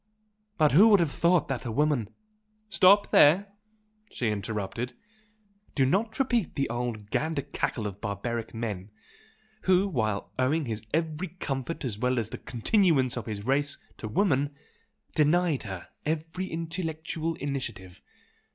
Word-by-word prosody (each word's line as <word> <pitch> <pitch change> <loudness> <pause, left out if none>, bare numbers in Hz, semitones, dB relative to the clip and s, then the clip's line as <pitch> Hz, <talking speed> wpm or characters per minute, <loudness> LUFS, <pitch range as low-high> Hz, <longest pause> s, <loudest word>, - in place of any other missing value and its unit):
But 155 -2 +4
who 190 - +8
would 205 -3 +6
have 165 -4 +1
thought 170 +2 +3
that 130 -3 -2
a 120 - -3
woman 140 -4 +1 0.3
" 215 0 -43
"Stop 200 +1 +5
there!" 195 +7 +5 0.6
she 120 - -1
interrupted 105 +3 -3 0.8
"Do 135 - +3
not 215 - 0
repeat 240 - +1
the 140 -1 0
old 120 -4 -4
gander 155 -2 0
cackle 130 -5 -2
of 100 -1 -5
barbaric 110 +3 -3
man, 105 -4 -4 0.8
who, 190 +1 +4
while 110 - -1
owing 145 +4 +2
his 110 -3 -4
every 160 +2 -1
comfort 150 -3 -4
as 105 -5 -3
well 125 +1 +1
as 110 -1 -2
the - - -6
continuance 135 - +2
of 120 - -5
his 105 -2 -5
race, 140 +2 +1 0.2
to 110 - -6
woman, 145 - +1 0.6
denied 160 0 +3
her 95 -2 -7
every 165 +4 -2
intellectual 165 -1 -3
initiative! 125 -10 -5
145 Hz, 140 wpm, -28 LUFS, 115-170 Hz, 0.8 s, who